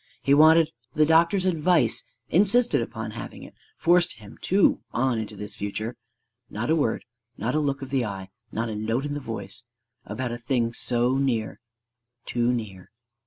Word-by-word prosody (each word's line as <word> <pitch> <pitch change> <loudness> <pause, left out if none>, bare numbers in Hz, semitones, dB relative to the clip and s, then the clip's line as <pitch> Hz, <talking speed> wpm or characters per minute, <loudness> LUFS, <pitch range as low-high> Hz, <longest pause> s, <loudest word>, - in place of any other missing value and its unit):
He 140 - +4
wanted 160 +2 +6 0.2
the 155 - +5
doctor's 170 +4 +4
advice, 165 -8 +2 0.2
insisted 220 +7 +3
upon - - -5
having - - -8
it, - - -12 0.2
forced 175 0 +3
him 105 -1 -14
too 195 +1 +3
on 120 -1 +1
into 110 - -5
this 105 0 -7
future. 110 +3 -4 0.5
Not 120 +8 -2
a - - +5
word, 145 -8 0 0.3
not 115 - -1
a 155 - +2
look 140 -2 -1
of 135 - -8
the 135 -3 +1
eye, 95 -3 -6 0.2
not 115 +1 -2
a 110 - -4
note 115 +6 -1
in 145 - -3
the 145 - -3
voice, 110 -4 -6 0.4
about 120 +3 -4
a 120 - -5
thing 120 -1 0
so 125 +2 +1
near, 120 -6 -1 0.7
too 120 0 +1
near. 105 -7 -5
125 Hz, 170 wpm, -25 LUFS, 110-155 Hz, 0.7 s, wanted